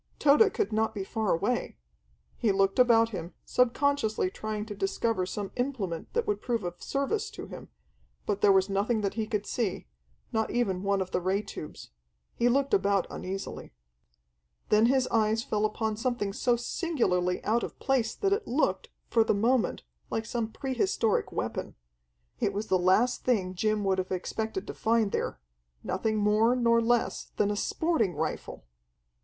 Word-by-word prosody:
Tode 300 +9 +5
could 415 - 0
not 220 +1 +1
be 200 - -2
far 220 +1 -1
away! 205 +9 -1 0.6
He 225 -4 +1
looked 195 +3 +2
about 230 -2 +5
him, 175 -5 -6
subconsciously 250 -5 +1
trying 215 0 -4
to 215 - -6
discover 195 0 -1
some 200 +1 -4
implement 230 -11 -3
that 470 -1 +1
would 415 0 -1
prove 235 -4 -1
of 175 0 -6
service 395 +11 -1
to - - -8
him, - - -10 0.6
but 205 -1 -1
there 205 - +6
was 190 -1 +4
nothing 210 +3 0
that 200 -1 -1
he 220 -2 -2
could 210 -1 -2
see, 215 -6 -2 0.5
not 220 -1 +1
even 195 -7 0
one 200 0 +1
of 185 - -4
the 180 - 0
ray 190 +3 0
tubes. 180 -7 -9 0.4
He 240 - +2
looked 275 +2 +1
about 200 -1 +3
uneasily. 195 - -6 1.0
Then 215 +2 +5
his 260 0 +2
eyes 220 0 +2
fell 210 -2 0
upon 215 0 -1
something 230 -4 -1
so 245 +3 +2
singularly 230 - 0
out 230 +3 +2
of - - -6
place 250 -5 0
that 395 0 +1
it 420 +1 -2
looked, 275 +6 0 0.2
for 230 - +3
the 220 - +1
moment, 235 +4 +1 0.3
like 225 - -2
some 230 -1 -3
pre 270 +2 -4
historic 240 - +1
weapon. - - -4 0.6
It - - 0
was 210 +2 -4
the 185 - +3
last 190 +8 +3
thing 195 -7 +1
Jim 215 +2 0
would 190 -1 +1
have 185 0 -3
expected 220 - -3
to - - -6
find 225 -2 +1
there - - -2 0.4
nothing 215 +3 -1
more 215 +3 +3
nor 235 -2 +3
less 235 0 +1
than 205 0 +1
a - - -1
sporting 230 - 0
rifle! 155 - -4
220 Hz, 170 wpm, -29 LUFS, 195-245 Hz, 1.0 s, there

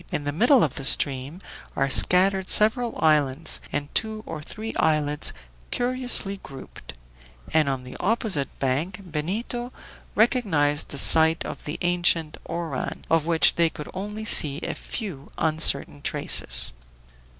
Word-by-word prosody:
In 145 - -3
the 145 - -3
middle 240 - +3
of 140 - -3
the 135 - -6
stream 140 +5 +1 0.3
are 135 - 0
scattered 185 +7 +4
several 230 +3 +2
islands 150 -1 +2
and 145 0 -5
two 220 -1 -2
or 160 -2 -7
three 220 +8 -8
islets 150 -2 +1 0.4
curiously 245 -5 -1
grouped; 135 - -12 0.6
and 155 -3 +2
on 135 -2 -4
the 125 - -11
opposite 200 -8 -1
bank 150 +9 -3
Benito 205 +10 -5 0.4
recognized 185 - +1
the 140 - -4
site 160 +3 +6
of - - -9
the 150 - -5
ancient 175 -3 +1
Oran, 165 -5 -5
of 165 -1 +1
which 165 -1 +3
they 170 -1 +1
could 150 - -10
only 210 +3 -7
see 145 -8 +4
a - - -3
few 180 - -7
uncertain 155 - +1
traces. - - +2
160 Hz, 140 wpm, -23 LUFS, 145-205 Hz, 0.6 s, site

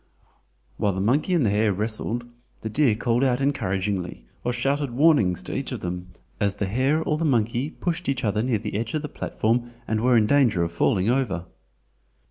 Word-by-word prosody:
While 100 -2 +1
the 95 - -3
monkey 140 - +2
and 155 -8 +3
the 100 - +2
hare 105 +1 +2
wrestled, 110 +4 -2 0.4
the 110 - -4
deer 130 -3 +3
called 120 +2 +1
out 125 -2 +2
encouragingly 95 - -1 0.2
or 120 - 0
shouted 135 +3 0
warnings 125 - +3
to - - -6
each - - -3
of - - -4
them 90 0 -4 0.3
as 100 -1 +1
the 100 - -2
hare 130 +10 +1
or 155 -1 -1
the - - -1
monkey 120 -1 +1
pushed 175 0 -3
each 135 -2 -1
other 105 -1 +1
near 120 -1 +1
the 105 +1 -5
edge 115 +4 -2
of 155 - -2
the - - -3
platform 120 +1 -1 0.2
and 110 0 0
were 125 0 +4
in 110 - +4
danger 120 -9 +3
of 85 - -2
falling 90 +3 +1
over. 105 -10 -1
115 Hz, 200 wpm, -24 LUFS, 100-135 Hz, 0.4 s, were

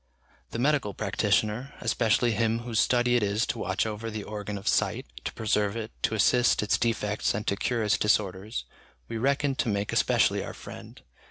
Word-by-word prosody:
The - - -5
medical 130 -6 +1
practitioner, 110 +5 0
especially 115 +1 +2
him 115 +1 +1
whose 120 -2 -1
study 120 0 +3
it 120 - +3
is 105 +3 +1
to 120 - -3
watch 95 +1 0
over 110 +1 -4
the 110 -2 -5
organ 105 -1 -5
of 100 - -9
sight, - - +1 0.2
to - - -3
preserve 105 -1 0
it, 110 -1 -5
to 110 - +1
assist 120 +3 +3
its 105 - +1
defects 105 -4 0
and 105 - -3
to 100 - +1
cure 115 +3 -1
its 105 - +2
disorders, 105 +1 0 0.4
we 115 -1 -4
reckon 140 +2 +1
to 120 - 0
make 100 -1 -1
especially - - +2
our - - -7
friend. - - -11
110 Hz, 185 wpm, -27 LUFS, 105-120 Hz, 0.4 s, study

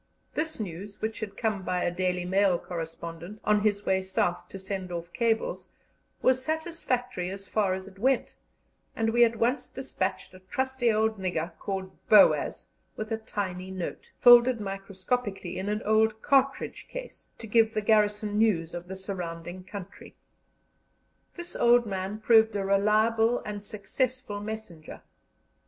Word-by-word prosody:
This 315 -2 -2
news, 200 0 -6
which 220 0 -3
had 200 -2 -6
come 215 -4 0
by 180 -1 -1
a - - +1
Daily 180 0 -1
Mail 190 0 +3
correspondent, 170 +3 -7
on 210 0 +3
his 205 -1 +1
way 190 0 +2
South 185 -2 -1
to - - -7
send 190 -1 -5
off 170 0 -6
cables, 225 -1 0 0.5
was 255 0 +3
satisfactory 260 - -2
as 195 0 -7
far 200 -4 +1
as 190 0 -8
it 195 0 -14
went, 260 +3 +1 0.6
and 225 0 +1
we 240 +1 +5
at 230 -1 +3
once 250 +3 0
despatched 190 -9 -3
a 185 - -13
trusty 260 +5 0
old 220 0 +1
nigger 175 -3 -2
called 190 -1 -4
Boaz 215 - +5 0.3
with 215 +1 -5
a 225 - +1
tiny 190 -4 -4
note, 185 -2 -6
folded 240 0 +7
microscopically 195 0 -3
in 195 +2 -3
an 210 +1 -2
old 220 0 +2
cartridge 275 0 +1
case, - - -9
to - - -9
give 225 0 +3
the 215 - +1
garrison 210 0 +2
news 175 -7 +2
of 175 0 -6
the 190 - -6
surrounding 180 -2 -6
country. 190 0 -10 1.2
This 345 0 -7
old 240 0 +5
man 195 0 -3
proved 220 -1 +5
a 195 -1 -1
reliable 215 +4 +3
and 205 -1 -5
successful 215 +2 -2
messenger. 205 -7 -8
205 Hz, 150 wpm, -28 LUFS, 190-225 Hz, 1.2 s, folded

